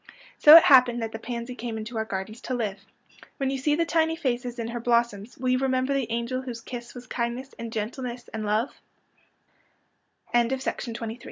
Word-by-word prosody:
So 305 +2 +11
it 335 - +8
happened 250 -3 +6
that 225 - -3
the 225 - -6
pansy 235 +1 -5
came 235 -2 -5
into 220 +2 -6
our 220 0 -1
gardens 210 +2 -5
to 255 - -3
live. 210 -3 -4 0.5
^'\nien 270 -1 0
you 270 - -2
see 295 +3 +2
the 335 +2 +1
tiny 325 -1 +1
faces 245 -6 -2
in 230 -1 -4
her 240 0 -4
blossoms 235 -2 0
will 255 0 -1
you 255 0 +3
remember 260 0 +1
the 270 -4 -1
angel 235 +2 -2
whose 245 -3 -6
kiss 240 +1 -8
was 245 0 -9
kindness 245 +2 -4
and 230 -1 -5
gentleness 240 +3 -4
and 220 -1 -3
lo 215 +5 +1
240 Hz, 180 wpm, -26 LUFS, 225-260 Hz, 0.5 s, So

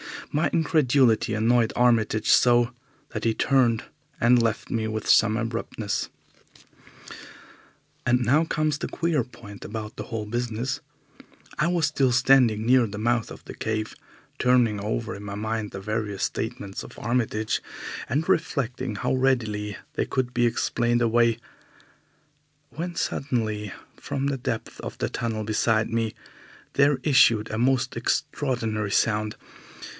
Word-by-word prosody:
My 155 +3 +1
incredulity 135 -9 +3
annoyed 115 +1 +2
Armitage 110 -3 +2
so 120 -1 +5 0.4
that - - -5
he 115 -1 +2
turned 125 -4 +2 0.4
and 120 +1 +5
left 115 -2 -1
me 110 -1 0
with 110 0 -4
some 110 0 +5
abruptness. 115 -2 -3 2.0
And 125 +1 +3
now 140 +7 +3
comes 155 -2 0
the - - -3
queer 165 -6 0
point 115 -4 -12
about 110 +1 -6
the - - -4
whole 110 -3 -4
business. 120 +4 -2 0.8
I 155 - +3
was 175 -3 +2
still 135 -3 +1
standing 125 -4 +4
near 125 -1 +4
the 105 0 -7
mouth 115 +1 0
of - - -11
the - - -9
cave 110 0 -3 0.5
turning 125 -4 +3
over 110 +2 -3
in 100 - -8
my 100 0 -5
mind 110 0 -3
the 95 - -7
various 105 -1 -3
statements 100 -4 -3
of - - -11
Armitage, 110 -2 -1 0.5
and 145 +7 0
reflecting 130 - -1
how 100 - -1
readily 110 -6 0 0.2
they - - -1
could 125 -1 -2
be 120 -1 +3
explained 120 +1 0
away, 115 0 +3 1.3
when 175 +1 -5
suddenly, 110 -9 -2 0.3
from 140 0 -3
the 140 -1 -1
depth 120 -3 -4
of - - -7
the - - -2
tunnel 110 -2 -3
beside 110 +1 +1
me, 115 -1 -1 0.6
there 140 -1 +3
issued 120 -7 +4
a 110 - -2
most 130 +1 +1
extraordinary 110 -6 -1
sound. 105 0 +1
115 Hz, 140 wpm, -25 LUFS, 110-130 Hz, 2.0 s, so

